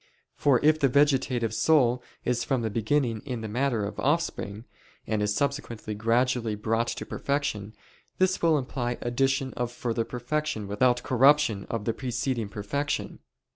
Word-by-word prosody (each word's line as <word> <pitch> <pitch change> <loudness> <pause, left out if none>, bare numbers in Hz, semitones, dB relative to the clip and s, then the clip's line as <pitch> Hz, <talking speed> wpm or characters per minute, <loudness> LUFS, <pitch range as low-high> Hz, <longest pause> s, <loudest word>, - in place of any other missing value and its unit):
For 135 -4 +3
if 155 0 +5
the 140 - +4
vegetative 130 -4 +2
soul 125 0 +3 0.2
is 120 -1 +1
from 120 0 0
the 110 - -1
beginning 115 +1 0
in 125 -5 -4
the 110 - -4
matter 120 -1 0
of 100 - -6
offspring, 130 -8 -1 0.4
and 110 -1 -1
is 105 0 0
subsequently 120 -5 -2
gradually 115 +1 +1
brought 115 +2 0
to - - -4
perfection; 115 -7 -2 0.4
this 185 0 +2
will 165 -2 +4
imply 125 -2 -3
addition 135 +2 0
of 120 -1 -3
further 120 -1 -2
perfection 125 -2 -3
without 120 +5 +2
corruption 130 -5 +3
of 115 -3 -3
the 115 - +1
preceding 120 -2 -2
perfection. 140 +9 -3
120 Hz, 150 wpm, -27 LUFS, 110-140 Hz, 0.4 s, if